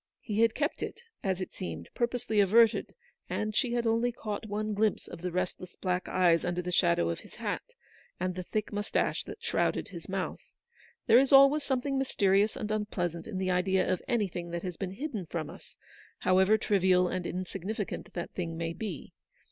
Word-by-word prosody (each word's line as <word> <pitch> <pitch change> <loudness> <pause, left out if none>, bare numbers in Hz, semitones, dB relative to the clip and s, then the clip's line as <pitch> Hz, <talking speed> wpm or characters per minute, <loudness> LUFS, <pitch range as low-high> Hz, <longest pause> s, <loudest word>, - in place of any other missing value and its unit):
He 215 -1 -1
had 230 -1 +4
kept 295 +2 -1
it, 470 - -5 0.2
as 190 -2 0
it 185 - -5
seemed, 85 -1 -6
purposely 235 -3 0
averted, 220 +3 +4 0.3
and 215 0 -2
she 240 +1 +1
had 240 -1 0
only 230 +2 +2
caught 220 -2 -5
one 215 +1 -2
glimpse 215 0 +1
of - - -9
the 180 0 -2
restless 180 0 -3
black 180 -1 -2
eyes 170 -2 +4
under 175 0 -1
the 180 - -3
shadow 170 - +3
of 85 - -2
his - - -14
hat, - - -2 0.6
and 185 +1 -1
the 185 - -4
thick 215 +4 -3
moustache 205 +1 0
that - - -9
shrouded - - 0
his - - -9
mouth. - - -3 0.6
There 230 - +7
is 270 0 +2
always 275 +2 +8
something 275 0 0
mysterious 205 -5 +2
and 215 -1 -4
unpleasant 180 -6 -2
in 215 -4 -4
the 185 0 0
idea 185 +1 +2
of 180 - -3
anything 195 -8 -1
that 170 0 -4
has 180 -2 -4
been 190 0 -4
hidden 225 - -4
from 155 -3 -4
us, - - -14 0.4
however 190 +3 +4
trivial 185 -3 +3
and 180 -1 -2
insignificant 190 +3 -4
that 175 - -4
thing 165 -3 -4
may 165 0 -2
be. 190 -6 -6
195 Hz, 190 wpm, -30 LUFS, 180-220 Hz, 0.6 s, always